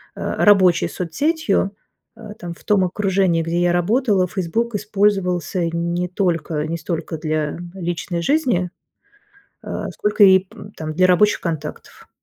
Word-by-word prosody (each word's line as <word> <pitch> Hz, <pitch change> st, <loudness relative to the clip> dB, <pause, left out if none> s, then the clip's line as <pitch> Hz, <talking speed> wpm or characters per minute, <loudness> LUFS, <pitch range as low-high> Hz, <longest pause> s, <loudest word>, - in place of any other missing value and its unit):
э, -, -, -3 dB
рабочей 185 Hz, -4 st, +4 dB
соцсетью, 200 Hz, -, -1 dB, 0.4 s
э, 215 Hz, -2 st, -9 dB
там 175 Hz, -1 st, -6 dB
в -, -, -19 dB
том 200 Hz, -3 st, +2 dB
окружении, 190 Hz, -2 st, +1 dB
где 165 Hz, +1 st, -1 dB
я 175 Hz, 0 st, +2 dB
работала, 200 Hz, +2 st, +2 dB
"Фейсбук" 195 Hz, +6 st, -2 dB
использовался 195 Hz, -4 st, 0 dB
не 170 Hz, +1 st, -2 dB
только 165 Hz, -4 st, -1 dB
не 165 Hz, +2 st, -3 dB
столько 165 Hz, 0 st, -4 dB
для 155 Hz, -1 st, -2 dB, 0.2 s
личной 175 Hz, -1 st, -3 dB
жизни, 215 Hz, -, +1 dB, 0.9 s
а, -, -, -5 dB
сколько, 210 Hz, 0 st, +3 dB
ип 190 Hz, -1 st, +4 dB, 0.2 s
там 155 Hz, -1 st, -5 dB
для 185 Hz, +3 st, +3 dB
рабочих 205 Hz, +3 st, +3 dB
контактов. 155 Hz, -3 st, -6 dB
180 Hz, 135 wpm, -20 LUFS, 170-205 Hz, 0.9 s, рабочей